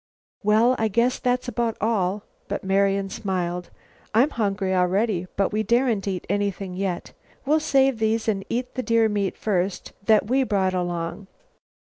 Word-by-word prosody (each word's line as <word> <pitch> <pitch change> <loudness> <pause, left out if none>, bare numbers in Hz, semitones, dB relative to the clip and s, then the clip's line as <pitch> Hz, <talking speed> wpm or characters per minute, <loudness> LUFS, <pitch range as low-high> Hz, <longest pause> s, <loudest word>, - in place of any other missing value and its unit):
"Well, 220 +4 +4
I 220 - +2
guess 235 +4 +1
that's 250 0 0
about 235 -1 -1
all," 205 -2 0 0.2
but - - -3
Marian 195 0 +1
smiled. 180 -3 -3 0.5
"I'm 260 +7 +4
hungry 200 -5 -1
already, 185 +1 +1
but 200 +1 +1
we 215 - +1
daren't 230 -2 +1
eat 185 -2 -3
anything 200 -1 -2
yet. 185 -2 -3 0.3
We'll 305 +3 +3
save 270 -5 +2
these 220 +1 0
and 200 -3 0
eat 245 +2 -2
the 255 - -2
deer 230 -2 +3
meat 205 -3 -1
first 195 -2 -2
that 215 -1 +4
we 260 +5 +2
brought 195 -7 +1
along." 175 +1 -3
205 Hz, 155 wpm, -24 LUFS, 190-230 Hz, 0.5 s, Well